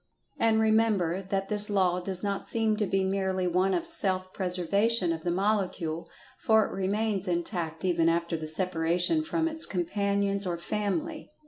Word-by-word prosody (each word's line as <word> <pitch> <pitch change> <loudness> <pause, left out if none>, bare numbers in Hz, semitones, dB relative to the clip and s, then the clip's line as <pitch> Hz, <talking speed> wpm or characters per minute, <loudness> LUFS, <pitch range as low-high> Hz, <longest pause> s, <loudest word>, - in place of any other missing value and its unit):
And, 225 -1 +3
remember, 215 -5 +2
that 195 0 -2
this 210 0 +3
law 185 -3 +2
does 185 +1 -5
not 200 -1 -2
seem 225 -2 +1
to 210 -2 0
be 195 0 +1
merely 190 -1 -1
one 180 +2 +2
of 340 - -2
self 185 - -1
preservation 185 +1 +1
of 160 -1 -6
the 175 - -1
Molecule—for 195 +2 0
it - - -6
remains 200 +1 -1
intact 170 -1 -3
even 170 -2 +2
after 170 0 0
the 155 -1 -5
separation 175 - +1
from 325 0 -1
its 320 0 +1
companions 200 +2 -1
or 175 -1 -2
family. 210 - -3
195 Hz, 155 wpm, -28 LUFS, 175-210 Hz, -, And